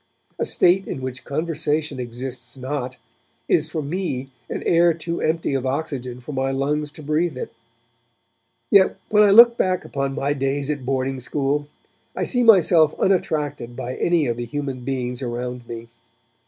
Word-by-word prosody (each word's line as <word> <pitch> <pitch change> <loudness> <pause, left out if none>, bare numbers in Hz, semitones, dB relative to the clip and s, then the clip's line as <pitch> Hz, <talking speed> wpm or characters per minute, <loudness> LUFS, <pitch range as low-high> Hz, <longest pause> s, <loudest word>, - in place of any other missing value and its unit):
A - - 0
state 185 +2 +3
in - - -4
which 130 0 -5
conversation 150 -1 -1
exists 125 +1 -6
not, 130 -1 -4 0.5
is 155 -1 +2
for 155 -1 -3
me 140 -5 -3 0.2
an - - -4
air 170 -1 +4
too 170 +1 -3
empty 160 -2 0
of 135 -2 0
oxygen 130 -3 -3
for 125 +4 -8
my 135 -1 -1
lungs 145 +2 -1
to 155 - -11
breathe 155 0 0
it. - - -6 1.2
Yet 195 -2 +5
when 210 -1 +5
I 210 - +6
look 235 +3 +8
back 185 -1 0
upon 135 -1 -2
my 145 0 0
days 140 +1 -1
at 140 -4 -5
boarding 135 0 -1
school, 145 +3 -1 0.5
I - - -1
see 245 - +2
myself 175 -8 +5
unattracted 150 -10 0
by 125 +1 -4
any 170 -3 +2
of 120 -2 -1
the 120 - -3
human 135 +1 -4
beings 125 -1 -3
around 125 0 -4
me. 115 0 -7
140 Hz, 165 wpm, -22 LUFS, 130-160 Hz, 1.2 s, look